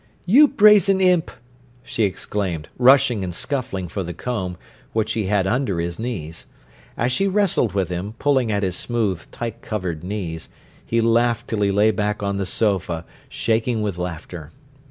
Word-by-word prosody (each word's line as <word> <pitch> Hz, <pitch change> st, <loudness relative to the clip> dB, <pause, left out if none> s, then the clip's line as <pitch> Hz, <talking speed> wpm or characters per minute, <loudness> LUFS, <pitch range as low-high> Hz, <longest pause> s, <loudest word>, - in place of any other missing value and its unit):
"You 265 Hz, +12 st, +7 dB
brazen 210 Hz, -, +5 dB
imp!" 180 Hz, -3 st, +3 dB, 0.5 s
she 110 Hz, -, 0 dB
exclaimed, 95 Hz, -4 st, -3 dB
rushing 125 Hz, -4 st, +5 dB
and 90 Hz, -2 st, -4 dB
scuffling 115 Hz, -10 st, -3 dB
for 100 Hz, -, -4 dB
the 85 Hz, -2 st, -5 dB
comb, 95 Hz, -8 st, -4 dB, 0.4 s
which 110 Hz, -1 st, 0 dB
he 110 Hz, -3 st, -1 dB
had 100 Hz, -1 st, +1 dB
under 105 Hz, -4 st, 0 dB
his 85 Hz, +2 st, -3 dB
knees. 90 Hz, -10 st, -5 dB, 0.5 s
As 120 Hz, +2 st, 0 dB
she 195 Hz, +10 st, +1 dB
wrestled 195 Hz, -, +1 dB
with 95 Hz, -2 st, 0 dB
him, 90 Hz, +5 st, -4 dB
pulling 135 Hz, -5 st, +1 dB
at 100 Hz, -1 st, 0 dB
his 90 Hz, -2 st, -1 dB
smooth, 105 Hz, -8 st, -1 dB
tight 115 Hz, 0 st, -6 dB
covered 90 Hz, -7 st, -4 dB
knees, 90 Hz, -4 st, -5 dB, 0.3 s
he 115 Hz, 0 st, 0 dB
laughed 115 Hz, 0 st, +2 dB
till 110 Hz, -2 st, -1 dB
he 100 Hz, -, +3 dB
lay 105 Hz, +2 st, +4 dB
back 105 Hz, 0 st, -2 dB
on 100 Hz, 0 st, -1 dB
the 100 Hz, -1 st, -2 dB
sofa 90 Hz, -6 st, 0 dB, 0.2 s
shaking 115 Hz, 0 st, 0 dB
with 100 Hz, -4 st, -3 dB
laughter. 85 Hz, -2 st, -6 dB
105 Hz, 165 wpm, -22 LUFS, 90-120 Hz, 0.5 s, You